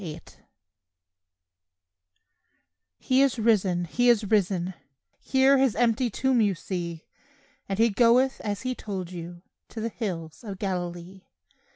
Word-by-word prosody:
RISEN 160 -1 -7 2.7
"He 260 +1 +2
is 275 -3 +2
risen; 195 -6 +2
He 245 +8 +2
is 230 -2 +4
risen, 190 -3 0 0.5
Here 270 +1 +3
His 265 -4 +2
empty 240 +1 +2
tomb 255 +2 +1
you 200 -3 +2
see; 170 -2 -5 0.6
And 195 - -2
He 225 +1 +3
goeth 245 +5 +3
as 205 +1 -3
He 255 0 -1
told 190 -7 -6
you 175 0 -8 0.3
To 225 - -8
the 225 +1 -2
hills 170 -8 -6
of 200 -4 -7
Galilee." 180 -1 -5
205 Hz, 130 wpm, -26 LUFS, 175-240 Hz, 2.7 s, is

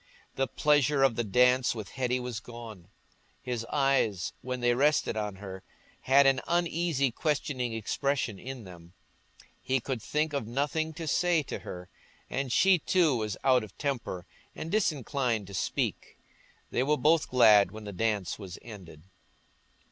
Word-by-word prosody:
The 135 0 0
pleasure 145 +1 +2
of 135 -4 +3
the 120 - 0
dance 125 +4 +3
with 110 -4 -6
Hetty 125 -1 -1
was 125 -3 -4
gone; 115 -7 -10 0.5
his 120 -2 -4
eyes, 135 -9 +1
when 125 0 -4
they 120 0 +2
rested 145 0 +2
on 105 -2 -3
her, 95 -1 -8 0.4
had 140 +2 +6
an 135 -1 +4
uneasy 170 -5 +1
questioning 130 -3 -1
expression 115 -1 -1
in 130 -2 -7
them; 85 -2 -13 0.7
he 130 0 0
could 125 -1 -4
think 150 +6 -1
of 140 -6 -2
nothing 145 +6 -1
to 165 0 -6
say 170 +1 +2
to - - -6
her; 90 0 -8 0.4
and 135 -1 -2
she 190 +6 +5
too 165 -3 +2
was 105 -3 -3
out 130 -3 +4
of 110 - -12
temper 120 - -3 0.3
and 165 - -6
disinclined 135 - 0
to 100 - -11
speak. 95 - -2 0.5
They - - +1
were 150 +3 +2
both 155 +1 +3
glad 110 -5 +6
when 110 0 -10
the 100 -1 -7
dance 105 -1 -1
was 95 -3 -8
ended. 90 -9 -11
125 Hz, 155 wpm, -29 LUFS, 110-145 Hz, 0.7 s, had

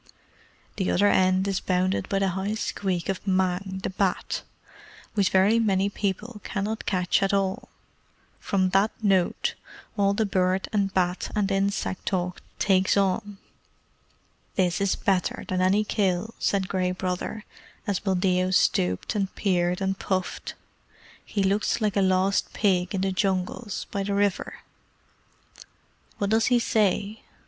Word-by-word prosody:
[The 190 -3 0
other 205 +3 +3
end 185 0 +3
is 195 -1 0
bounded 185 0 0
by 195 - +1
the 195 0 +2
high 190 +3 -2
squeak 190 -5 -2
of 195 +1 -3
Mang, 190 0 0
the - - -2
Bat, 190 -1 -1 0.7
which 200 -3 +2
very 200 +4 +4
many 200 -3 +2
people 210 +3 -3
cannot 210 +2 -3
catch 180 -1 +1
at 195 0 +2
all. 195 -1 -1 0.7
From 190 -2 +1
that 195 +3 +3
note 190 -4 +2 0.4
all 200 0 +3
the 220 - +1
bird 185 -1 +1
and 200 -2 +1
bat 180 -1 0
and 200 -2 +1
insect 195 -1 -1
talk 180 -2 -1 0.2
takes 190 -1 +3
on.] 200 +1 0 1.2
"This 180 -1 +1
is 200 -1 +2
better 190 -2 0
than 185 0 -1
any 195 +3 +3
kill," 205 0 0
said 195 -2 0
Gray 185 -2 0
Brother, 185 +4 -3 0.4
as 200 -4 0
Buldeo 185 -1 +1
stooped 90 - +1
and 195 -2 -1
peered 180 -2 +1
and 195 0 -1
puffed. 185 -1 -3 0.7
"He 200 - -2
looks 200 +4 +1
like 210 -3 0
a 200 - +3
lost 190 +1 +2
pig 185 -3 +1
in 190 - -1
the 195 0 0
Jungles 190 +3 -2
by 200 - -2
the 200 0 -1
river. 200 -1 -1 1.6
What 200 0 -1
does 225 0 +3
he 245 - +4
say?" 215 -2 +1
195 Hz, 145 wpm, -26 LUFS, 185-200 Hz, 1.6 s, very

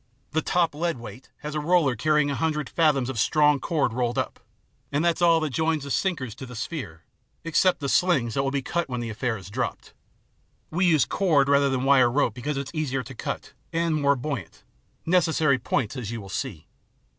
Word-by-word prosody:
The 160 - +1
top 170 0 +1
lead 170 0 -1
weight 120 +2 -11
has 150 0 -5
a 155 - -1
roller 150 -4 +2
carrying 150 +3 +2
a - - -1
hundred 150 -2 -1
fathoms 150 -6 +2
of 130 -4 -3
strong 150 +3 +3
cord 145 -5 0
rolled 120 +1 -1
up, 130 - -2 0.5
and 145 +4 +1
that's 170 0 +1
all 165 -1 +5
that 155 -2 -1
joins 160 +1 0
the 140 - -6
sinkers 140 - -1
to 130 - -8
the 125 - -10
sphere, 105 - -6 0.4
except 175 +2 +2
the 140 - -2
slings 140 -8 +2
that 135 - +1
will 135 - 0
be 140 -1 -2
cut 170 +3 -2
when 125 -1 -3
the 115 -1 -4
affair 110 +1 -2
is 95 0 -11
dropped. - - -4 0.8
We 180 +3 +2
use 155 -6 +4
cord 155 -8 +2
rather 140 0 +4
IN 135 - 0
THE - - +1
ABYSS 125 - -3
75 135 -1 +6
than - - +4
wire - - -1
rope 115 - 0
because 135 +5 -3
it's 140 -1 -4
easier 135 -5 -1
to 135 - -10
cut - - -5 0.2
and 165 0 0
more 140 -2 +3
buoyant 125 - -5 0.4
necessary 160 -5 +3
points, 130 0 -1
as 120 -6 -5
you 115 0 -4
will 100 -2 -10
see. 80 -4 -4
140 Hz, 220 wpm, -25 LUFS, 125-160 Hz, 0.8 s, 75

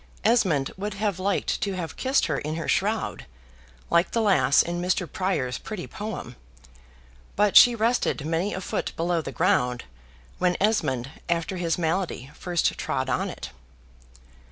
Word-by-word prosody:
Esmond 185 - +2
would 205 +1 -4
have 200 -3 -1
liked 195 +1 0
to 200 - -1
have 170 -4 -5
kissed 265 +1 +1
her - - -1
in 155 +1 -4
her 165 - -4
shroud 200 - -1 0.6
(like 170 +1 +4
the 230 - 0
lass 140 -10 +4
in 175 0 -3
Mr. 180 +1 0
Prior's 140 -8 -2
pretty 210 -5 -6
poem); 205 - -6 1.0
but 205 -1 +2
she 245 -1 +9
rested 225 - 0
many 165 +5 0
a 190 - -4
foot - - -3
below 170 0 0
the - - -6
ground, 145 -10 +1 0.6
when 180 -1 +2
Esmond 145 - 0 0.2
after 170 +2 -1
his 170 -2 0
malady 165 -5 -2
first 175 -2 0
trod - - -2
on - - 0
it. - - -7
180 Hz, 155 wpm, -25 LUFS, 160-205 Hz, 1.0 s, she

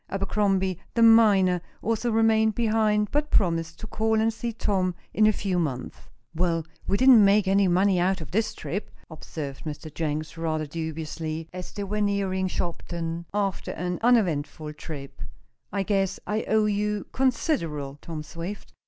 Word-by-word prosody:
Abercrombie, 195 -2 0 0.2
the 230 - +4
miner, 205 -6 +6 0.2
also 230 +2 0
remained 220 -1 +3
behind, 215 -2 +2
but 295 +1 0
promised 165 -4 +1
to - - -5
call 220 +1 0
and 225 +1 +2
see 230 +2 -4
Tom 190 -5 0 0.2
in 215 0 +4
a - - +6
few 195 -3 -1
months. 135 -7 -3 0.4
"Well, 165 -1 0 0.2
we 200 - +2
didn't 255 -3 +7
make 200 0 +4
any 195 0 +4
money 185 +1 +3
out 185 +2 +1
of 155 -4 -9
this 220 +4 0
trip," 200 +4 -4 0.2
observed 150 -3 -7
Mr. 155 0 -7
Jenks, 155 0 -3
rather 155 -1 -1
dubiously, 160 +1 -5
as 180 0 -7
they 205 - -5
were 210 +2 -2
nearing 195 -2 0
Shopton, 170 -1 -4
after 200 -2 -2
an 180 +1 -3
uneventful 160 -10 +1
trip. 140 -3 -9 0.5
"I 200 -1 0
guess 195 -1 0
I 215 +1 -1
owe 215 0 +3
you 210 0 -1
considerable, 165 - -1
Tom 160 -2 -6
Swift. 170 +6 -7
190 Hz, 155 wpm, -26 LUFS, 165-210 Hz, 0.5 s, didn't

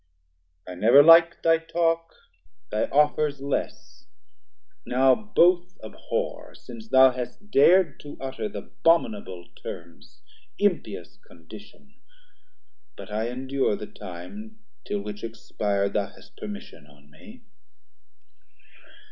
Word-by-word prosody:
170 - - -10
I - - -9
never 130 +6 +8
lik'd 165 +1 +6
thy 165 0 +4
talk, 165 0 -1 0.6
thy 105 - 0
offers 150 0 +1
less, 140 0 -5 0.8
Now 130 +1 +3
both 180 -4 +2
abhor, 110 - -5
since 115 -2 -12
thou 130 +1 +6
hast 125 - -8
dar'd 170 +1 +4
to 145 - -11
utter 135 +9 -5
The - - -7 0.2
abominable 105 - +1
terms, 85 -1 -11 0.3
impious 140 - -2
condition; 105 - -16 1.0
But - - -11
I 110 +2 -2
endure 130 -2 -1
the 105 - -7
time, 200 - -11 0.3
till 100 - -2
which 105 0 -8
expir'd, 100 -3 -2
Thou 100 -1 0
hast - - -19
permission 205 - -9
on 75 0 -22
me. 75 - -16
130 Hz, 115 wpm, -25 LUFS, 105-165 Hz, 1.0 s, never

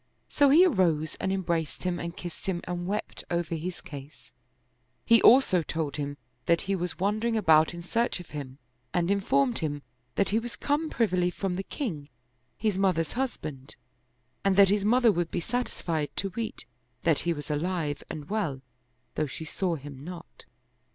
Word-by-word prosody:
So 285 -1 +4
he 325 +7 +8
arose 170 - +2
and 190 - 0
em 190 -1 -1
braced 165 -3 -2
him 180 -1 -1
and 170 0 -5
kissed 175 0 -7
him 175 -2 -1
and 175 0 -4
wept 210 +2 -3
over 170 -1 -1
his 170 +3 -4
case: 145 +1 -11 0.7
he 230 0 +6
also 235 -8 +6
told 155 -2 -3
him 145 -1 -3 0.3
that 170 0 +4
he 195 +1 -1
was 180 -1 -3
wandering 215 +4 +1
about 160 -6 +5
in 170 0 -8
search 230 +4 0
of 175 - -11
him 140 -3 -6 0.4
and 175 +1 +2
informed 230 +5 +2
him 145 -3 -3 0.3
that 200 - +2
he 220 - +2
was 235 +1 -6
come 300 +2 0
privily 185 -9 +2
from 185 0 -2
the 190 - -2
king, 170 - -4 0.5
his 210 -3 0
mother's 180 -5 +2
husband, 155 - -4 0.7
and 195 -1 +3
that 195 -1 +7
his 205 0 +2
mother 235 +2 +5
would 175 -3 -1
be - - -2
sat 245 +8 -1
isfied 160 -4 -2
to 195 - -1
weet 225 +3 -4 0.4
that 165 -3 +3
he 170 - 0
was 150 -2 -4
alive 150 -1 -1
and 150 -2 -6
well, 155 -12 -1 0.5
though 155 - 0
she 160 +4 -6
saw 175 +2 -1
him 140 -2 -9
not. 175 +1 -10
180 Hz, 180 wpm, -28 LUFS, 155-205 Hz, 0.7 s, he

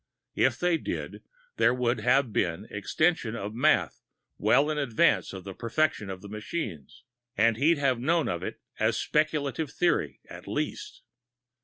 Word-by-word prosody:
If 130 -1 +2
they 175 -2 +1
did, - - -5 0.4
there 120 - +4
would 125 -1 0
have 125 +1 +2
been 85 -3 -1
extension 115 - 0
of 105 -1 -5
math 140 +7 +2 0.4
well 145 +3 +3
in 150 - -1
advance 145 +4 +2
of 95 -1 -8
the 95 0 -7
perfection 115 - -1
of 95 0 -7
the - - -8
machines, 105 - -6 0.3
and 115 +1 +4
he'd 150 +7 +3
have 135 -4 +1
known 160 +5 +1
of 85 - -2
it - - -5 0.2
as - - +2
speculative 150 -2 0
theory, 80 - 0
at - - -11
least. - - -4
125 Hz, 155 wpm, -28 LUFS, 105-155 Hz, 0.4 s, there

